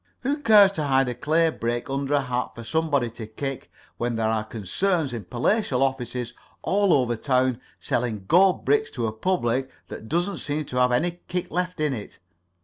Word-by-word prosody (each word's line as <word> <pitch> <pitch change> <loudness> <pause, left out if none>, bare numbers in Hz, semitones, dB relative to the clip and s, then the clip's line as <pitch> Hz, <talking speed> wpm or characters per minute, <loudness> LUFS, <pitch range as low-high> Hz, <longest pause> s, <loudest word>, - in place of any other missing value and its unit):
Who 280 +3 0
cares 210 -6 +7
to 155 -6 -2
hide 135 -2 +2
a - - -2
clay 160 +6 +2
brick 120 -3 -3
under 140 +1 -1
a 145 - +3
hat 125 -1 -3
for 115 - -8
somebody 140 -1 0
to 115 -1 -8
kick, 135 +5 -5 0.3
when 120 0 -1
there 110 -1 0
are 110 -1 0
concerns 135 - -1
in 115 -5 -5
palatial 130 - +1
offices 125 -3 -2 0.3
all 200 -1 +2
over 125 -6 +3
town 130 0 +1 0.2
selling 115 -5 -2
gold 185 +2 +4
bricks 435 0 +2
to 115 - 0
a 110 - -2
public 130 -2 0 0.2
that 110 - -8
doesn't 175 +5 -1
seem 150 0 -2
to 125 - -5
have 125 0 +4
any 175 +8 0
kick 180 0 -3
left 180 0 -2
in 150 -2 +1
it? 105 -5 -7
135 Hz, 190 wpm, -25 LUFS, 120-170 Hz, 0.3 s, cares